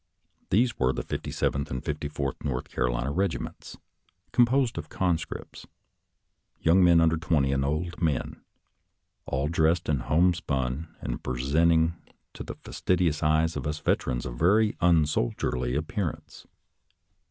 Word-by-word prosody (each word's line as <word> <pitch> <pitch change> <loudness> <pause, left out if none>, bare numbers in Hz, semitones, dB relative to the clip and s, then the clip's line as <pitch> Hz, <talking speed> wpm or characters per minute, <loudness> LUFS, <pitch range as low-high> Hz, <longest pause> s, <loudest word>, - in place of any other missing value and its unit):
These 115 +5 +2
were 65 +1 +2
the - - -3
Fifty - - -5
seventh 70 +2 -1
and 65 +2 -5
Fifty 75 0 -3
fourth 70 -2 -4
North 60 -3 -3
Carolina 60 +2 -1
regiments, 90 -5 -3 0.5
composed 120 -3 +3
of 75 -2 -8
conscripts 85 -3 -3 0.5
— - - -49
young 90 +3 +4
men 85 -1 +6
under 80 0 +3
twenty 75 -4 +1
and 70 0 +1
old 80 +4 -2
men 75 -7 -1 0.4
— - - -51
all 70 +2 -1
dressed 80 +1 +1
in 75 -3 +1
homespun, 75 -3 0
and - - -4
presenting 80 +6 +2 0.4
to - - -9
the - - -6
fas - - -10
tidious 85 -4 +1
eyes 80 +2 +2
of - - -3
us 75 0 -2
veterans 65 -4 -1
a 65 - -4
very 100 - +3
unsoldierly 75 -6 +1
appearance. 80 - -4
80 Hz, 140 wpm, -27 LUFS, 70-85 Hz, 0.5 s, men